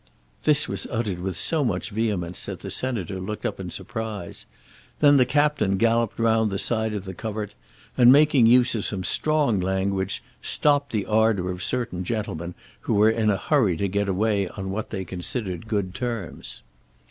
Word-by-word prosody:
This 150 -1 +4
was 100 -1 -3
uttered 110 -6 -2
with 95 0 -3
so 160 -3 0
much 115 - -2
vehemence 100 -6 -2
that - - -6
the - - -6
Senator 105 -8 -2
looked 105 +3 -5
up - - -2
in - - -5
surprise. 110 -6 -6 0.5
Then 145 -1 +6
the 125 -2 +4
Captain 145 -8 +2
galloped 115 +1 +2
round 115 -1 +2
the 95 - -2
side 110 +1 -1
of 100 -1 -5
the 95 - -6
covert, 105 +1 -5 0.4
and, 125 0 +7
making 140 -4 +6
use 125 +1 +5
of 110 -3 -2
some 95 -3 -3
strong 145 - +1
language, 95 +1 -1 0.2
stopped 145 -2 +2
the 105 -3 -1
ardour 110 -4 +2
of 90 0 -6
certain 100 -4 -2
gentlemen 90 -5 -4 0.2
who - - -1
were 105 +2 +5
in 110 -1 +1
a 100 - +2
hurry 105 - +2
to 100 - 0
get 100 +1 -1
away 100 0 +1
on 95 +1 -6
what 110 +3 -4
they 95 -3 -4
considered 95 +2 -3
good 100 -4 -1
terms. 115 -7 -5
105 Hz, 180 wpm, -24 LUFS, 95-120 Hz, 0.5 s, and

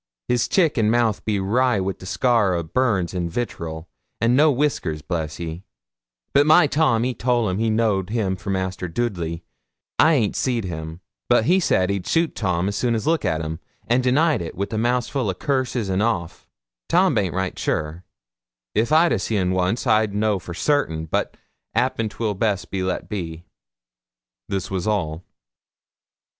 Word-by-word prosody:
His 120 -2 +1
chick 165 -9 +2
and 105 -1 +3
mouth 115 -2 +1
be 105 -2 0
wry 120 +4 +2
wi' 95 +1 -1
scar 105 -1 +2
o' 85 - -1
burns 100 -2 0
or 90 - -2
vitterel, 85 -3 -4 0.3
an' 115 +2 +3
no 150 +3 +5
wiskers, 120 - -1
bless 80 -3 -3
you; 85 0 -5 0.7
but 145 +1 +4
my 155 +2 +7
Tom 145 -6 +2
ee 130 - -1
toll 120 -3 +1
him 95 +2 -2
he 115 0 +1
knowed 110 -4 +1
him 105 -4 0
for 90 +1 -8
Master 95 -1 -2
Doodley. 85 -5 -3 0.6
I 160 +1 +6
ant 110 -7 +1
seed 120 -4 0
him; 80 -1 -6 0.3
but 120 -2 +4
he 185 +7 +4
sade 95 - +2
ad 100 -3 -3
shute 165 -1 +1
Tom 95 -1 0
soon 115 +3 0
is 110 - -3
look 160 -1 +1
at 80 0 0
'im, 80 +1 -5 0.3
an' 120 +2 +2
denide 145 - +2
it, 85 - -6
wi' 100 +4 -3
mouthful 120 +1 0
o' 95 - -2
curses 130 -2 -1
and 95 +1 0
oaf. 105 -7 -2 0.4
Tom 180 -1 +4
baint 100 -7 0
right 95 -1 -2
shure; 80 +3 -2 0.7
if 115 +6 +1
I 165 +2 +5
seed 110 - -1
un 90 -1 +1
wons 95 +5 0
i'd 110 -2 +2
no 105 -1 +1
for 85 0 -8
sartin; 85 - 0
but 80 - -2 0.4
'appen,'twil 110 -1 0
best 100 -1 -1
be 95 - -2
let 95 0 -2
be.' 85 -5 -5 1.1
This 95 -1 -3
was 95 0 -2
all. 90 -6 -1
105 Hz, 170 wpm, -22 LUFS, 90-120 Hz, 1.1 s, my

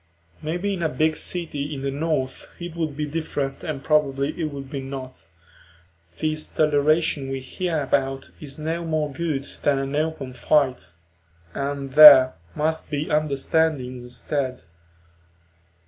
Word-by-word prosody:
Maybe 175 +6 -2
in 185 - -4
a 160 - +1
big 155 +4 +1
city 155 -5 -3
in 135 - -6
the 140 - -1
North 140 -3 -2
it 175 -1 -7
would 155 -4 -3
be 150 - -1
different 145 -3 -3
and 150 -5 -4
probably 140 -2 +2
it 160 +1 -3
would 140 -1 -7
not: 135 - -7 0.9
this 155 0 -1
toleration 150 -1 +2
we 135 0 -3
hear 160 +4 -2
about 135 0 -1
is 140 -2 -7
no 165 +2 -3
more 155 -3 -1
good 145 -2 -2
than 145 -1 +2
an 135 +1 -3
open 150 -4 -2
fight, 130 - +1 0.6
and 140 -1 -4
there 140 -4 +10 0.2
must 160 +1 -1
be 150 +1 -3
understanding 150 -2 0
instead. 130 +1 -4
145 Hz, 135 wpm, -23 LUFS, 135-155 Hz, 0.9 s, there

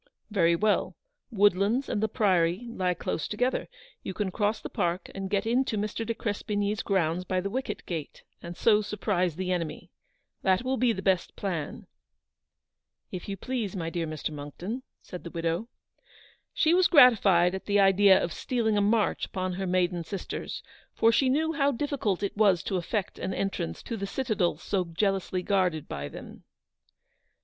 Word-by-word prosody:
"Very 170 -5 +3
well; 210 +4 +1 0.3
Woodlands 205 +3 +2
and 205 - -1
the 220 - +2
Priory 185 -1 +2
lie 185 -5 0
close 160 - -3
together. 250 +5 -1 0.3
You 190 - -6
can 205 -3 -1
cross 210 +3 0
the - - -6
park 175 +2 -2
and 195 -1 -5
get 200 +1 0
into 235 -1 +1
Mr. 210 +2 -2
de 230 +1 -3
Crespigny's 205 -1 -2
grounds 180 -3 0
by 185 0 -1
the 195 +2 -3
wicket 260 +3 -4
gate, 160 -5 -6 0.2
and 170 0 -8
so 215 -2 +4
surprise 200 -5 -1
the 185 +1 -2
enemy. 170 -4 -3 0.5
That 190 +3 +2
will 260 +1 0
be 250 -2 +3
the 190 -3 -4
best 190 -3 +1
plan." 170 -7 -4 0.6
" - - -57
If 185 +2 -6
you 195 - -3
please, 230 -3 -3
my 165 -3 -3
dear 165 -1 -2
Mr. 155 0 -4
Monckton," 155 - -6 0.2
said 180 - -8
the 170 - -6
widow. 170 +5 -2 0.8
She 320 +1 +3
was 365 0 +5
gratified 200 - +6
at 190 - -5
the 205 0 +3
idea 195 0 +6
of 170 - -2
stealing 225 -4 0
a - - +3
march 210 +1 +1
upon 185 -1 -3
her 190 +1 -3
maiden 180 -1 +1
sisters, 195 +3 -5 0.3
for 225 - +4
she 260 +3 +3
knew 320 +4 +1
how 285 -2 +2
diffi 285 +2 -3
cult 200 -2 0
it 200 - -2
was 200 -5 +3
to 190 - -1
effect 185 +3 -3
an 185 0 -3
entrance 140 - -3
to 230 - -4
the 200 -2 -4
citadel 205 - 0
so 185 +3 -1
jealously 185 +1 -1
guarded 180 -6 +1
by 70 0 -5
them. - - -11
195 Hz, 175 wpm, -28 LUFS, 180-220 Hz, 0.8 s, gratified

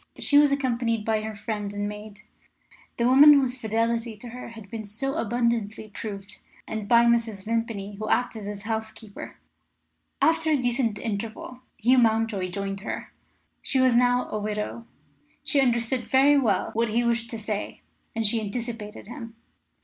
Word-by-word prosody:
She 285 - +4
was 290 -1 +5
accompanied 235 -5 0
by 220 -1 +1
her 215 0 -5
friend 210 -1 -4
and 205 0 -3
maid 210 0 -9 0.8
the 235 - +2
woman 280 +4 +9
whose 260 -3 +2
fidelity 230 -1 -1
to 240 +3 -9
her 250 +2 -8
had 225 -3 -11
been 225 -1 -5
so 230 +7 -3
abundantly 230 -2 -1
proved 200 -1 -7 0.3
and 215 -2 -4
by 235 +1 +6
Mrs. 230 -4 +1
Vimpany, 220 -3 -2
who 215 - -4
acted 225 -4 0
as 205 -1 -6
housekeeper. 220 -1 -6 0.8
After 325 0 +3
a 305 - +4
decent 245 -3 0
interval, 225 +3 -5 0.2
Hugh 250 +3 +4
Mountjoy 220 -5 +1
joined 195 +1 -4
her. 200 - -6 0.5
She 265 - 0
was 255 -1 +4
now 245 +1 +3
a 215 - -2
widow. 210 +2 -4 0.6
She 280 - +2
understood 240 -1 +1
very 275 +2 +5
well 265 -6 +1
what 230 +1 +1
he 235 +3 +1
wished 235 -1 0
to 230 - -4
say, 210 -1 -4 0.3
and 225 0 0
she 220 +2 +2
anticipated 220 0 -5
him. 230 0 -9
230 Hz, 160 wpm, -26 LUFS, 210-245 Hz, 0.8 s, woman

